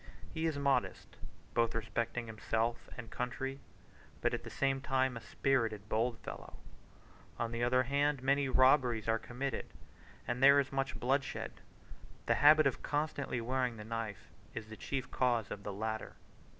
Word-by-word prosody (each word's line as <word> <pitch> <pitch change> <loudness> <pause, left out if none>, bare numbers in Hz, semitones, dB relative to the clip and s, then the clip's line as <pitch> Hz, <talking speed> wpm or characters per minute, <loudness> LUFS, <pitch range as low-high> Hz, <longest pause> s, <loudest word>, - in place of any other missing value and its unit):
He 160 0 0
is 155 -3 -1
modest, 140 -1 0 0.4
both 115 -1 +2
respecting 115 +1 -2
himself 110 +1 -2
and 120 -3 -8
country, 135 +2 -3 0.6
but - - +1
at - - -2
the - - -7
same 135 -1 0
time 130 -2 +1
a 115 - -6
spirited, 110 -3 0
bold 115 +2 +1
fellow. - - -8 0.8
On 115 -1 -2
the 115 0 -2
other 125 +1 +4
hand, 140 +1 +1
many 140 0 +2
robberies 130 -4 +4
are 115 0 +2
committed, 125 +2 -4 0.6
and 120 +1 -2
there 140 +1 +8
is 140 -1 0
much 135 -1 -2
bloodshed: 135 +2 -1 0.6
the - - +3
habit 155 +1 +8
of 135 - +1
constantly 145 -4 -1
wearing 125 0 -1
the 105 - -7
knife 110 -4 -5 0.2
is 110 -1 -6
the 110 - -7
chief 135 +3 -4
cause 120 -4 +1
of 100 - -5
the 100 - -5
latter. 110 +2 -3
125 Hz, 160 wpm, -34 LUFS, 115-135 Hz, 0.8 s, there